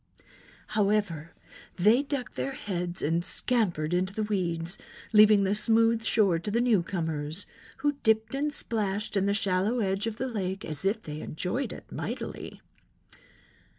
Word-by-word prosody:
However, 200 -7 0 0.4
they 215 +8 +4
ducked 280 -3 -4
their 270 - -3
heads 180 -10 -4
and 165 +3 +1
scampered 175 -10 +1
into 185 +2 0
the 215 - -1
weeds, 175 -4 -2 0.3
leaving 210 -1 +7
the 195 +1 +1
smooth 225 +1 +4
shore 200 -7 +3
to 170 - -5
the 225 +3 +1
new 235 -6 +3
comers, 160 -1 -3 0.4
who 290 - +5
dipped 220 +1 +2
and 290 +2 0
splashed 210 -6 -1
in 195 0 +2
the 200 - +2
shallow 200 +3 +1
edge 195 0 0
of 220 -1 -4
the 260 - -2
lake 195 -5 -3
as 155 +4 -4
if 215 +3 0
they 150 0 -6
enjoyed 185 - -3
it - - -11
mightily. - - -6
200 Hz, 150 wpm, -28 LUFS, 180-225 Hz, 0.4 s, leaving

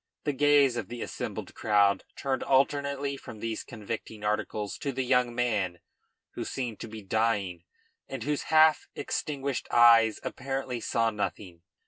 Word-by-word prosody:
The 145 - 0
gaze 145 -2 +4
of 110 -5 -3
the 120 +1 -5
assembled - - -5
crowd 100 -2 +2
turned 135 -1 -2
alternately 140 +1 +1
from 110 - -10
these 115 0 -3
convicting 110 -1 -7
articles 105 0 -2
to 140 - -2
the 130 0 -2
young 125 -1 +2
man, 105 -8 0 0.5
who - - -5
seemed 120 -5 -4
to - - -6
be 110 -1 -9
dying 100 -4 0 0.4
and - - -5
whose 145 +1 -1
half 155 0 +5
extinguished 140 -3 -3
eyes 115 -2 +6
apparently 135 -2 -3
saw 115 0 +1
nothing. 100 -4 -4
120 Hz, 145 wpm, -28 LUFS, 105-135 Hz, 0.5 s, eyes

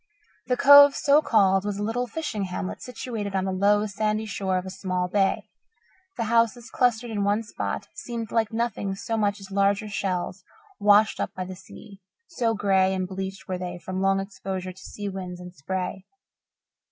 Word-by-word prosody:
The 250 -1 +1
Cove, 285 0 +9
so 290 +2 +4
called, 195 -7 +3
was 205 -1 -3
a 205 - -2
little 240 +3 -1
fishing 235 -6 -3
hamlet 185 +1 -5
situated 225 -5 -5
on 190 0 0
the 190 - -1
low, 205 +2 +3
sandy 215 +1 -1
shore 190 -2 -1
of 180 - -3
a 190 - -6
small 185 -1 -2
bay. 195 +1 +1 0.7
The 230 - 0
houses, 230 +2 +1
clustered 240 -1 +1
in 205 -2 -1
one 205 +3 +1
spot, 210 - -4
seemed 235 -10 -6
like 225 -1 +1
nothing 225 -4 -2
so 225 +3 -3
much 205 -2 0
as 195 0 -11
larger 200 +2 +1
shells 190 -2 -3 0.4
washed 210 +1 +4
up - - -3
by 185 -1 -4
the 185 0 -7
sea, 195 +2 -14 0.3
so 235 -9 0
grey 190 -2 +2
and 185 -1 -2
bleached 190 0 -6
were 185 -1 -3
they 180 -1 -5
from 185 +2 -5
long 195 0 +3
exposure 190 -2 -5
to 185 - -16
sea 205 -1 -6
winds 185 -2 -6
and 180 0 -10
spray. 185 +5 -4
200 Hz, 185 wpm, -25 LUFS, 190-225 Hz, 0.7 s, Cove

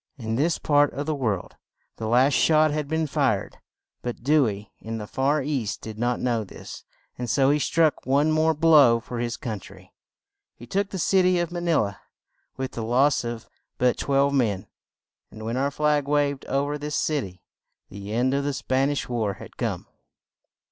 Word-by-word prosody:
In 115 -3 -3
this 155 +6 +1
part 145 -1 +3
of 145 - -3
the 155 - -1
world 110 -10 -3 0.4
the 110 - -4
last 125 +5 +4
shot 155 +1 +4
had 150 -1 -2
been 160 +1 0
fired; 135 -9 -1 0.4
but 120 -1 -5
Dew 145 -1 +4
ey 100 0 -6
in 115 +1 -5
the 105 - -5
far 135 +6 0
east 130 -7 -2
did 110 -1 -7
not 120 +1 0
know 120 -3 0
this, 95 - -10 0.4
and 125 -1 -3
so 135 +3 +3
he 150 - +2
struck 160 +1 +1
one 145 +4 +2
more 160 +1 +2
blow 145 -7 +6
for 120 +1 -7
his 120 -1 -2
coun 115 -8 -4
try. - - -15 0.6
He 120 - -12
took 195 +10 -1
the 195 - -5
cit 185 +2 +3
y 185 - +4
of 175 -1 -2
Ma 175 - -3
ni 170 -1 +1
la 100 -5 0 0.6
with 130 -1 -3
the 115 - -5
loss 130 +5 +2
of 120 -1 -5 0.3
but 125 0 +2
twelve 140 0 +1
men, 110 -8 0 0.6
and 110 0 -10
when 115 +2 -2
our 135 +2 +1
flag 150 0 +1
waved 145 -1 0
o 140 +1 +1
ver 145 +1 -3
this 150 +1 -4
cit 150 -4 0
y, 90 -1 -10 0.5
the 100 +1 -8
end 125 +4 +1
of 140 0 0
the 145 0 -1
Span 135 +1 0
ish 145 - -2
war 115 -5 -1
had - - -12
come. - - -3
135 Hz, 200 wpm, -25 LUFS, 115-150 Hz, 0.6 s, blow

